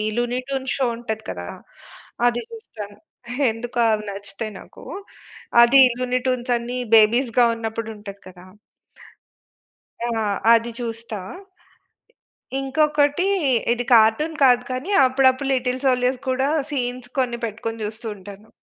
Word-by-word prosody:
'Luni 240 +1 -1
tune' 265 -1 -3
show 270 - 0
ఉంటది 220 -2 -5
కదా! 90 -1 -6 0.8
అది 240 0 0
చూస్తాను. 210 - -10 0.5
ఎందుకొ 240 +2 -5
అవి 215 0 -2
నచ్చుతాయి 200 +2 -6
నాకు. - - -15 0.8
అది 270 +3 +6 0.2
'లూని 250 0 0
ట్యూన్స్' 250 -1 0
అన్ని 240 +2 -5 0.2
బేబీస్‌గా 235 +2 +4
ఉన్నప్పుడు 225 0 -4
ఉంటది 200 -1 -10
కదా! 180 -1 -14 1.6
ఆ! - - -2 0.4
అది 230 +1 +2
చూస్తా. 230 -2 -5 1.4
ఇ - - 0
ఇంకొకటి 295 +4 +1 0.5
ఇది 245 +1 -2
కార్టూన్ 230 +9 +4
కాదు 250 -2 +5
కానీ, 255 +9 -4 0.2
అప్పుడప్పుడు 260 +1 +2
'లిటిల్‌ 255 0 -1
సోల్జర్స్‌' 255 +1 +1
కూడా 265 +2 +1 0.2
సీన్స్ 250 -3 -3
కొన్ని 240 -2 -1
పెట్టుకొని 225 +1 -5
చూస్తూ 220 +3 -6
ఉంటాను. 200 +2 -12
240 Hz, 120 wpm, -22 LUFS, 220-260 Hz, 1.6 s, అది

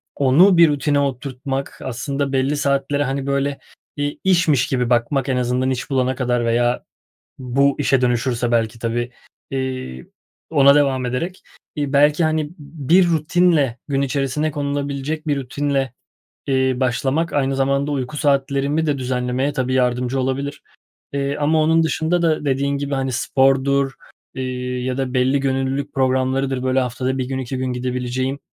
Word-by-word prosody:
onu 165 +8 +5
bir 170 -2 +7
rutine 145 0 +1
oturtmak, 135 0 -3
aslında 135 +2 -3
belli 135 +2 +1
saatlere, 140 0 0
hani, 135 0 -3
böyle 140 0 -1 0.4
bir 145 0 -2
işmiş 165 -8 +3
gibi 125 -4 0
bakmak 125 +3 +1
en 130 - +1
azından 125 +1 0
iş 130 -1 -3
bulana 130 -1 +1
kadar 120 -2 0
veya 120 +1 +1 0.5
bu 135 +2 +2
işe 135 -2 +2
dönüşürse 120 -1 0
belki 115 -1 0
tabii, 120 +1 -2 0.4
eee, 130 - -4 0.4
ona 140 -3 +6
devam 135 -3 +2
ederek, 165 +10 -3 0.3
eee, 145 -2 -2
belki, 150 +3 +4
hani, 155 -1 0
b 165 - -17 0.3
bir 180 +1 +6
rutinle 160 -5 +2
gün 140 -1 0
içerisine 140 +3 -1
konulabilecek 145 +1 -3
bir 145 -2 +1
rutinle, 135 0 -1 0.5
eee, 130 -1 +2
başlamak 130 +6 0
aynı 135 -1 0
zamanda 140 +1 +1
uyku 135 0 -3
saatlerimi 140 +2 +1
de 145 -2 0
düzenlemeye 125 +2 -1
tabii 130 -1 -1
yardımcı 125 +1 +1
olabilir, 135 +2 -3 0.5
eee, 140 0 -1
ama 155 +2 +3
onun 160 +1 +3
dışında 160 +2 0
da 155 -2 +1
dediğin 140 0 0
gibi, 140 0 -2
hani, 135 -1 -1
spordur, 135 +3 +2 0.4
eee, 130 -1 -3 0.4
ya 130 0 -2
da 130 -1 -2
belli 130 +2 +2
gönüllülük 135 +1 -1
programlarıdır, 130 0 0
böyle, 130 0 +2
haftada 130 +1 -2
1 130 - 0
gün, 135 0 -3
2 130 0 -4
gün 130 0 -2
gidebileceğim 125 +2 -2
135 Hz, 150 wpm, -20 LUFS, 130-145 Hz, 0.5 s, bir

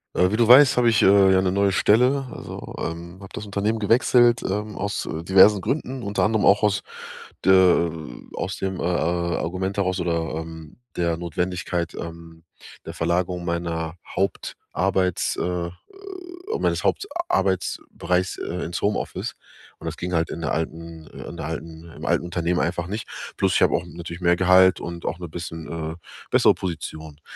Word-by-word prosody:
Äh, 90 0 +4
wie - - +1
du 115 - +3
weißt, 130 +3 +8
habe 120 -1 +5
ich, 110 - +3
äh, 95 0 +6
ja 95 - +4
'ne 95 -1 +1
neue 100 0 +2
Stelle. 125 +8 +3
Also, - - -8
ähm, 85 +2 -6
habe 95 - -10
das 105 - -6
Unternehmen 105 +2 -1
gewechselt, 120 +2 +4
ähm, 105 +2 -3
aus, 100 +1 -2
äh, 80 0 -5
diversen 95 +3 +6
Gründen, 130 - -3
unter 100 0 -1
anderem 110 -1 +2
auch 100 +2 +5
aus 105 -2 +2 0.6
der, 95 - +7 0.3
ähm 80 -7 -8
aus 95 +1 -3
dem, 95 -1 -3
äh, - - -3
äh, - - +1 0.5
Argument 95 +3 -3
heraus 95 -1 0
oder, 85 -2 -1
ähm, 80 -1 -8 0.2
der 85 -1 +1
Notwendigkeit, 85 0 -2
ähm, 85 -1 -9 0.4
der - - -6
Verlagerung 85 +1 -1
meiner 85 -1 -2
Hauptarbeits, 95 -1 -1
äh 90 -1 -2 0.9
meines - - 0
Hauptarbeitsbereichs, 95 - -1
äh, 90 +1 -4
ins 85 0 -4
Homeoffice. 105 +1 -2 0.4
Und - - -11
das - - -3
ging 90 - -4
halt 80 -1 +1
in 85 - -5
der 80 - -2
alten, 80 0 -4
äh - - -9
in 85 - -9
der 80 - -5
alten 80 +1 -7
im - - -8
alten - - +1
Unternehmen 85 0 -1
einfach 85 0 -1
nicht. 105 +4 -5 0.3
Plus - - +2
ich - - +3
habe - - +4
auch 85 - 0
natürlich 85 0 -8
mehr 85 0 +4
Gehalt 95 +1 +5
und 85 0 -6
auch 80 - -2
'ne 90 -2 -7
bisschen, 80 0 -7 0.3
äh, - - -10 0.3
bessere - - +5
Position. 80 -4 -6
90 Hz, 175 wpm, -23 LUFS, 85-100 Hz, 0.9 s, weißt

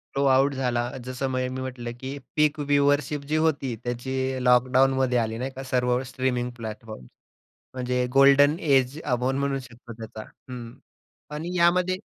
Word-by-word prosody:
Blow 140 - +1
out 135 +2 +4
झाला. 120 -2 -1 0.2
जसं 130 +1 -3
म - - -2 0.2
मी 130 - -4
म्हटलं, 125 -2 -5
की 135 +2 -6 0.2
पीक 150 0 +2
व्ह्यूअशिप 145 0 +1
जी - - +2
होती, 145 -6 0
त्याची 130 +1 -2
लॉकडाउनमध्ये 130 +1 +3
आली 110 -1 -1
नाही 130 +2 -4
का, 135 0 -8
सर्व 125 -1 +1
स्ट्रीमिंग 125 -1 -2
प्लॅटफॉर्म्स. 110 - -8 0.7
म्हणजे 125 0 -1
गोल्डन 140 +2 +6
एज 135 -1 +2
आपण 130 0 0
म्हणू 140 -1 -1
शकतो 120 -1 -12
त्याचा. 110 -1 -9 0.3
हं. 120 -2 -7 0.6
आणि 170 +4 -5
यामध्ये 180 +2 +3
130 Hz, 150 wpm, -25 LUFS, 125-140 Hz, 0.7 s, गोल्डन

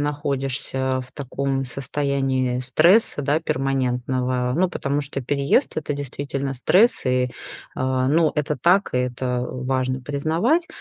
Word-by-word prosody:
находишься 135 -2 -1
в 125 - -16
таком 135 -1 -2
состоянии 135 -1 -1
стресса, 155 - +3
да, 145 +3 +2
перманентного. 130 -3 -1
Ну, 185 +2 +3
потому 145 -4 -2
что 140 0 -5
переезд- 140 - +1
это 155 -1 -2
действительно 140 -1 -4
стресс 185 - +3
и, 125 0 +2 0.5
а, 130 0 0
ну, 155 +1 +3
это 150 0 -1
так, 180 +9 +3
и 125 - +1
это 125 0 -1
важно 130 0 -2
признавать. 160 - 0
135 Hz, 130 wpm, -23 LUFS, 130-145 Hz, 0.5 s, стресса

